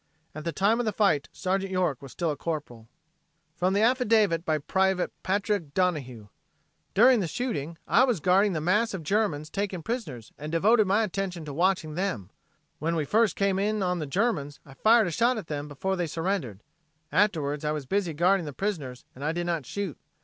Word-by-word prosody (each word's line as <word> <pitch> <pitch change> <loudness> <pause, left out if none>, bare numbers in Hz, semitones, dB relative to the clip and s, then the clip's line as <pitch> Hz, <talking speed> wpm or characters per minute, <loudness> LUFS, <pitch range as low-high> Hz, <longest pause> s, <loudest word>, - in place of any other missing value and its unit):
At 155 +1 -8
the 170 - -1
time 205 +7 +2
of 245 - 0
the - - +2
fight 195 -9 +1
Sergeant 190 +1 -2
York 180 -8 0
was 135 -2 -10
still 170 -2 -1
a - - -3
Corporal. 145 -9 -5 0.7
From 185 +2 +1
the 205 - +3
affidavit 220 - +3
by 155 -3 +1
Private 190 +5 0
Patrick 195 -5 -1
Donohue: 135 - -1 0.7
"During 245 +3 +6
the 185 - -1
shooting, 170 - -3
I 250 - +5
was 245 -8 0
guarding 190 +4 +3
the 155 - -2
mass 210 +6 +1
of 175 - -6
Germans 155 -5 0
taken 195 -4 -3
prisoners 155 - -5
and 150 +1 -6
devoted 210 +6 +4
my 205 +4 +3
attention 185 -4 -3
to 145 - -6
watching 175 -1 +1
them. 150 - -3 0.5
When 165 +3 -1
we 155 -3 0
first 220 +4 +2
came 195 -1 +1
in 210 0 0
on 180 -1 0
the 155 - -4
Germans, 150 - -1
I 135 - -13
fired 220 - +4
a 175 - -2
shot 235 +7 +2
at 215 - -5
them 150 -1 -4
before 170 +7 -2
they 175 -2 -1
surrendered. 160 - -3 0.5
Afterwards 155 -5 +1
I 150 - 0
was 150 -3 -3
busy 180 0 -1
guarding 180 +1 +2
the 145 - -6
prisoners 145 -10 -4
and 150 +5 -3
did 175 0 -2
not 165 -7 -2
shoot. 200 -7 -4
180 Hz, 195 wpm, -27 LUFS, 150-205 Hz, 0.7 s, During